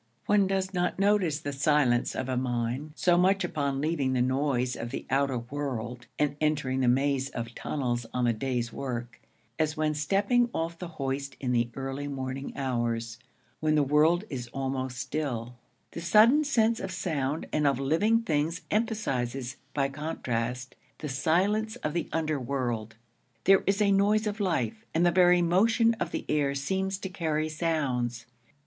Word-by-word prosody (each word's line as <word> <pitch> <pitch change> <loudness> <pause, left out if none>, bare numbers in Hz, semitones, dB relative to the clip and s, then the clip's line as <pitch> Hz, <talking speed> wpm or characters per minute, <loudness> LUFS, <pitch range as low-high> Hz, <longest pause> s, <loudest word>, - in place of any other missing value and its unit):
One 205 -2 +4
does 190 0 -1
not 180 -1 0
notice 195 -6 +2
the 145 -2 -4
silence 140 -3 +2
of 130 - -2
a 130 - -1
mine 125 +3 -2
so 175 0 +3
much 190 +2 +3
upon 140 -5 -1
leaving 145 -4 0
the 125 - +1
noise 130 -1 0
of 120 - -5
the 135 - -5
outer 135 -1 +2
world 125 -2 -5
and 150 -1 +1
entering 150 -4 +1
the 130 - +2
maze 135 +1 +2
of 115 0 -5
tunnels 120 -5 -2
on 125 -1 0
the 120 - +3
day's 120 0 -2
work, 120 -3 -5 0.4
as 155 0 0
when 155 0 +1
stepping 200 - +2
off 165 +1 -2
the 180 - -5
hoist 140 0 -3
in 125 -2 -1
the 120 -1 +2
early 135 +1 -4
morning 135 0 -4
hours, 120 -3 -2 0.4
when 155 0 +2
the 150 - +4
world 155 +6 +3
is 125 - -5
almost 130 0 -3
still: 130 -4 -3 0.4
the 170 - -6
sudden 220 - +6
sense 230 -5 +2
of 190 - -4
sound 150 -3 -2
and 150 -1 +2
of 135 -2 +2
living 205 +12 +2
things 160 -3 0
emphasizes, 135 - -1
by 140 -2 +1
contrast, 130 -4 -3 0.2
the 150 - -5
silence 195 - +1
of 150 - -1
the 170 - -2
underworld. 130 -8 -2 0.5
There 195 +1 +5
is 195 +1 +2
a 200 - +3
noise 205 +2 +3
of 210 +1 -3
life, 205 +3 -1
and 170 +2 +4
the 175 - +5
very 180 0 +5
motion 225 +7 +4
of - - -1
the - - -4
air 140 -2 +1
seems 190 +7 -1
to 195 - -5
carry 160 -4 -1
sounds. 130 -8 -1
145 Hz, 165 wpm, -28 LUFS, 130-175 Hz, 0.5 s, sudden